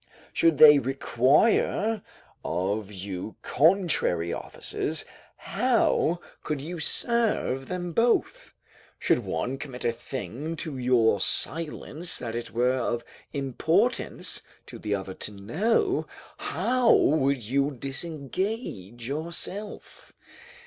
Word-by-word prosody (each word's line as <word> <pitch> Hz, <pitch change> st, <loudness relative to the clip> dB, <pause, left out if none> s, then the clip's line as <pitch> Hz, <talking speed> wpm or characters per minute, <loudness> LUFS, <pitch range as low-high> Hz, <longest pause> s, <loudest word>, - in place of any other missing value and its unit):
Should 165 Hz, -3 st, +3 dB
they 150 Hz, -1 st, +9 dB
require 140 Hz, -, +2 dB, 0.4 s
of 95 Hz, +5 st, -2 dB
you 95 Hz, +1 st, -6 dB
contrary 155 Hz, -, +2 dB
offices, -, -, -3 dB, 0.3 s
how 170 Hz, +2 st, +1 dB, 0.2 s
could 150 Hz, -2 st, -3 dB
you 165 Hz, +5 st, -6 dB
serve 215 Hz, -, +1 dB
them 175 Hz, -1 st, -3 dB
both? 230 Hz, +4 st, +1 dB, 0.5 s
Should -, -, +2 dB
one 125 Hz, +12 st, -3 dB
commit 130 Hz, -4 st, -6 dB
a 120 Hz, -, +3 dB
thing 130 Hz, -, -5 dB
to 160 Hz, -3 st, -4 dB
your 120 Hz, -5 st, +3 dB
silence 165 Hz, +1 st, 0 dB
that 115 Hz, -2 st, -5 dB
it 120 Hz, -, -4 dB
were 125 Hz, +2 st, +2 dB
of 120 Hz, -1 st, -1 dB, 0.3 s
importance 160 Hz, -, 0 dB, 0.2 s
to -, -, -10 dB
the 105 Hz, -1 st, -1 dB
other 95 Hz, -1 st, -5 dB
to 105 Hz, -, -5 dB
know, 205 Hz, -, 0 dB, 0.3 s
how 250 Hz, -2 st, +2 dB
would 140 Hz, -2 st, +3 dB
you 135 Hz, +6 st, +1 dB
disengage 140 Hz, -, -4 dB
yourself? 170 Hz, +8 st, -6 dB
140 Hz, 105 wpm, -27 LUFS, 115-175 Hz, 0.5 s, they